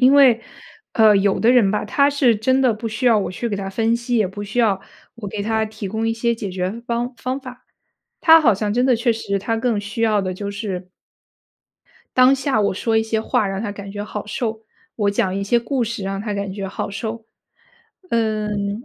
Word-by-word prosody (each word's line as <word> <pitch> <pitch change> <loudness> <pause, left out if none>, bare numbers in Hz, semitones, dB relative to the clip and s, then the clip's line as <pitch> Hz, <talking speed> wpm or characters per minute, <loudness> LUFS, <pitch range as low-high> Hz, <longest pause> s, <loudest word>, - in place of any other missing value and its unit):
因 255 +2 +7
为 260 -5 +6 0.5
呃， 215 -2 +5
有 195 0 +2
的 230 - +4
人 240 -6 +5
吧， 210 - -1
他 280 +7 +3
是 265 -5 +3
真 260 +5 +2
的 255 -4 +3
不 225 +2 -6
需 225 +4 -2
要 235 -2 +6
我 200 - -2
去 235 +6 -4
给 205 - -2
他 195 -1 -4
分 225 +3 +1
析， 240 +1 -2
也 215 -3 +3
不 205 +2 -7
需 205 +4 -5
要 215 -5 +3 0.4
我 230 -3 -8
给 200 +1 -4
他 220 +1 0
提 215 -2 -6
供 220 +3 -2
一 225 - +1
些 235 +1 0
解 210 -4 -5
决 185 +5 -3
方 240 +1 -2
方 255 +4 -3
法。 255 -1 -11 0.6
他 325 -1 +8
好 265 -8 +5
像 205 +1 -2
真 245 +1 +2
的 260 -1 +4
确 235 +1 +1
实 200 -3 -2
他 225 +4 -2
更 225 -2 0
需 210 +2 -5
要 215 -2 +3
的 185 -1 -3
就 200 +2 -5
是 195 -3 -5 1.3
当 255 +1 +7
下 270 -3 0
我 200 -2 +1
说 225 +3 0
一 220 - +2
些 220 0 -1
话 215 -2 0
让 195 0 -3
他 215 -2 -3
感 200 -1 -8
觉 205 0 -5
好 210 0 -6
受、 220 +1 -3 0.3
我 205 -2 +1
讲 190 -2 0
一 200 - -2
些 235 +4 +2
故 245 +2 -1
事 230 -2 -4
让 195 0 -3
他 210 0 -3
感 200 -1 -3
觉 195 0 -5
好 190 - -4
受。 220 +3 -5 0.8
嗯， 210 -2 -1
220 Hz, 240 characters per minute, -21 LUFS, 200-235 Hz, 1.3 s, 他